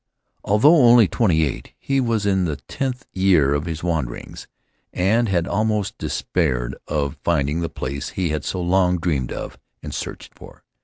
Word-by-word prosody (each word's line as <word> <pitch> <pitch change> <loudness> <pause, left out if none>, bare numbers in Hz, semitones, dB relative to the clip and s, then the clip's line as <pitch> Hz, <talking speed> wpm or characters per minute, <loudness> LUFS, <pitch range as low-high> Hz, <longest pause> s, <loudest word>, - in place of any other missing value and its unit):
Although 125 +12 +5
only 120 -5 +7
twenty 90 -9 +2
eight, 70 - -4
he 135 -1 0
was 115 -4 0
in 95 -2 +2
the 80 -3 -2
tenth 125 - -5
year 90 -8 +3
of 75 +2 -1
his 80 -2 -5
wanderings, 80 -9 -4 0.4
and 110 +5 +1
had 85 -3 0
almost 105 +1 -1
despaired 65 -7 -1
of 70 -2 -2
finding 75 -2 +1
the 85 - -2
place 70 +2 -5
he 90 -3 -2
had 75 -2 -2
so 90 - -3
long 90 0 +2
dreamed 75 -7 -1
of - - -6 0.2
and - - -6
searched - - -6
for. - - -15
90 Hz, 165 wpm, -21 LUFS, 75-105 Hz, 0.4 s, only